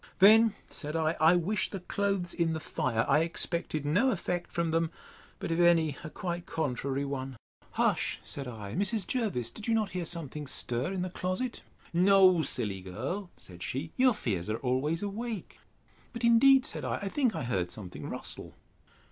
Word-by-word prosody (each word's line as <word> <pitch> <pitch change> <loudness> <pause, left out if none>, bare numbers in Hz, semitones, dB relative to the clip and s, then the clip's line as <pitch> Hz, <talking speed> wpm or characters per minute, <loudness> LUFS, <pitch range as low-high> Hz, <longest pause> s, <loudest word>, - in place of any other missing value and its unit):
Then, 215 +3 +7
said 150 +1 -6
I, 160 0 +1
I 160 +3 +7
wish 185 +5 0
the 195 - -5
clothes 195 -2 -1
in 165 -2 0
the 160 - -2
fire: 115 -6 -1
I - - +4
expected 165 -2 0
no 185 - +3
effect 180 -5 -2
from 170 -1 -1
them; 165 0 +1 0.5
but, - - -4
if 165 - 0
any, 165 -4 +4
a 155 - -6
quite 175 +1 -5
contrary 140 -2 -2
one. 135 -2 -4 0.4
Hush! - - +1
said 140 -2 -5
I, 105 -5 -7
Mrs. 200 +2 0
Jervis, 190 - -1
did 215 - -8
you 230 - +3
not 215 -3 0
hear 180 -2 -3
something 155 -3 -4
stir 125 +5 -1
in 190 -2 -2
the 185 - -4
closet? 185 +8 -3 0.3
No, 185 -1 +6
silly 105 -9 -1
girl, 175 - -4
said 90 -2 -10
she, 140 - -4
your 255 -3 +4
fears 95 - -2
are 110 - 0
always 140 - -1
awake.—But 225 +2 -8
indeed, 260 +3 +6
said - - -4
I, - - -1
I 200 - -4
think 250 +2 +1
I - - -3
heard 95 -8 -1
something 90 -3 -7
rustle. - - -2
170 Hz, 175 wpm, -30 LUFS, 135-200 Hz, 0.5 s, Then